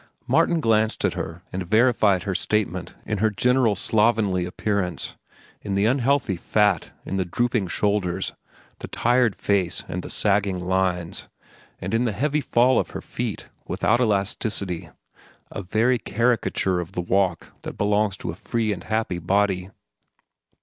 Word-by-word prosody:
Martin 170 - +3
glanced 110 -4 +2
at - - +1
her 85 +2 -6
and 95 - -2
verified 110 -1 +3
her 100 0 -2
statement 95 -3 -1
in 105 -2 -2
her 110 +2 +3
general 120 +1 +2
slovenly 105 -3 +2
appearance, 90 0 -2 0.5
in 100 -2 -3
the 100 +1 +2
unhealthy 130 -3 +2
fat, 100 0 +1 0.2
in 95 - -3
the 95 - +1
drooping 115 +2 0
shoulders, 100 -1 -1 0.5
the - - -6
tired 120 -3 +2
face 95 -4 0
with 90 - -4
the - - -8
sagging 100 -2 +1
lines, 90 -1 -1 0.5
and - - -4
in 115 +2 +2
the 110 - 0
heavy 150 +8 0
fall 125 -1 +3
of - - -2
her - - -6
feet, - - -5 0.2
without 120 +3 +1
elasticity—a 100 -4 -3
very 115 +6 +1
caricature 115 -5 0
of 90 +2 -6
the 90 - -1
walk 90 -1 0
that - - -7
belongs 105 -1 +1
to - - -4
a - - -9
free 110 +3 -1
and 90 -3 -9
happy 110 -5 -1
body. 95 +1 +1
100 Hz, 150 wpm, -24 LUFS, 95-115 Hz, 0.5 s, Martin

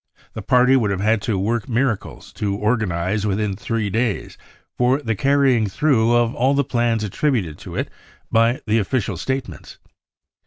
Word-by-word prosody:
The 110 - -6
party 125 +3 +4
would 115 -6 +2
have 100 -2 -1
had 110 +1 +1
to 110 -2 -1
work 115 +5 -1
miracles 120 -3 -2
to 100 -2 -2
organise 105 -3 -1
within 105 -1 -1
three 105 +1 -2
days 115 0 -2 0.4
for 125 +3 +2
the 115 -6 -2
carrying 135 -3 +2
through 120 0 +2
of 120 -1 +2
all 130 +4 +1
the 140 - +2
plans 120 -3 0
attributed 105 - -1
to - - -9
it - - -2 0.4
by 115 +2 +2
the 110 +1 +2
official 105 -2 -1
statements. 125 - -5
115 Hz, 160 wpm, -21 LUFS, 100-125 Hz, 0.4 s, party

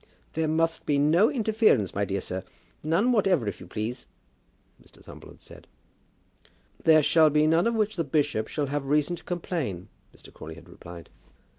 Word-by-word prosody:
"There 160 0 -1
must 165 +1 -1
be 145 - +2
no 160 +9 +4
interference, 215 - +1
my 100 +1 -1
dear 100 -1 -3
sir, 95 +1 -5 0.4
none 170 +11 +1
whatever, 190 - +2
if 100 - -4
you - - -11
please," 115 +3 -5 0.8
Mr. - - -22
Thumble - - -13
had - - -17
said. - - -15 1.2
"There 155 -1 +5
shall 160 +1 +4
be 150 +1 +2
none 165 +5 +3
of 235 - 0
which 215 -2 -1
the 165 - 0
bishop 145 -6 -1
shall 150 - -2
have 140 0 -4
reason 150 +4 +1
to - - -14
complain," 160 - -4 0.2
Mr. - - -17
Crawley 80 0 -10
had 85 +1 -15
replied. 85 -1 -12
150 Hz, 175 wpm, -26 LUFS, 110-170 Hz, 1.2 s, There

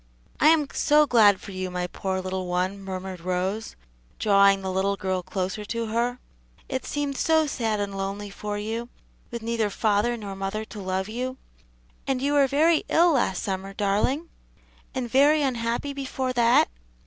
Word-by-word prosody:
"I - - +5
am 310 -2 +5
so 300 +1 +4
glad 215 -7 +5
for - - -10
you, 185 -1 -4
my 180 0 -2
poor 190 +1 -3
little 185 0 -3
one," 185 +3 -1
murmured 190 -1 -6
Rose, 185 +4 -2 0.4
drawing 200 -1 +4
the 190 - -2
little 195 +2 +1
girl 185 -1 -2
closer 185 +2 -3
to 230 +2 -3
her. 240 +2 0 0.5
"It 260 - -4
seemed 290 -1 -2
so 320 -1 +3
sad 225 -7 -1
and 200 -1 -3
lonely 195 +1 -4
for 205 +1 -4
you, 225 +3 -4 0.4
with 235 -1 -6
neither 230 -2 0
father 215 +3 +1
nor 200 -3 -6
mother 195 +3 -3
to 215 -1 -10
love 190 0 -2
you. 255 +4 -4 0.7
And 265 -2 0
you 280 +2 0
were 280 -2 +5
very 310 +4 +3
ill 340 +1 +5
last 235 - +1
summer, 195 0 -3
darling? 215 +11 0 0.7
and 255 -2 -2
very 285 +5 +4
unhappy 240 +2 -1
before 265 -2 -3
that? 235 -1 +4
215 Hz, 170 wpm, -25 LUFS, 195-255 Hz, 0.7 s, I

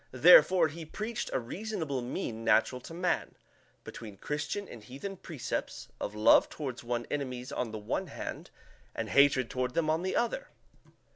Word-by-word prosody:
Therefore 165 +5 +7
he 160 +2 -8
preached 215 +8 -4
a - - +1
reasonable 160 - -4
mean 115 -2 -4
natural 120 +3 +3
to 165 - -10
man, 180 +1 -1 0.5
between 105 -4 -9
Christian 150 - -3
and 115 - -10
heathen 140 - -7
precepts, 160 -8 -5
of 105 - -4
love 105 +1 +6
toward 135 -5 -5
one's 120 0 -2
enemies 130 -3 -3
on 125 - -2
the 110 - -5
one 105 0 -3
hand, - - -6 0.5
and - - -3
hatred 140 -3 +5
toward 125 +1 -2
them 155 -2 +2
on 160 +2 +1
the 185 +1 -2
other. - - 0
140 Hz, 160 wpm, -30 LUFS, 120-175 Hz, 0.5 s, Therefore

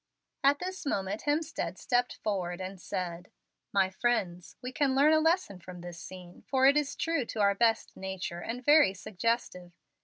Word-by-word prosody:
At 280 +1 +5
this 370 +4 -5
moment 200 -6 -2
Hemstead 305 +2 -1
stepped 245 -1 0
forward, 180 -4 -2
and 185 0 -6
said: 175 0 -4 0.4
"My 190 -1 +2
friends, 190 -5 -1
we 250 0 -6
can 270 0 +1
learn 290 +3 +5
a 315 - +5
lesson 320 - +1
from 180 0 -10
this 175 -1 -8
scene, 180 -1 -11
for 265 -1 +3
it 275 +1 +7
is 295 -2 0
true 330 -5 0
to 225 - -6
our 200 -1 +4
best 225 +1 +1
nature, 190 -2 -5
and 245 +5 -5
very 290 -10 +6
suggestive. 185 -3 -2
215 Hz, 175 wpm, -30 LUFS, 185-275 Hz, 0.4 s, it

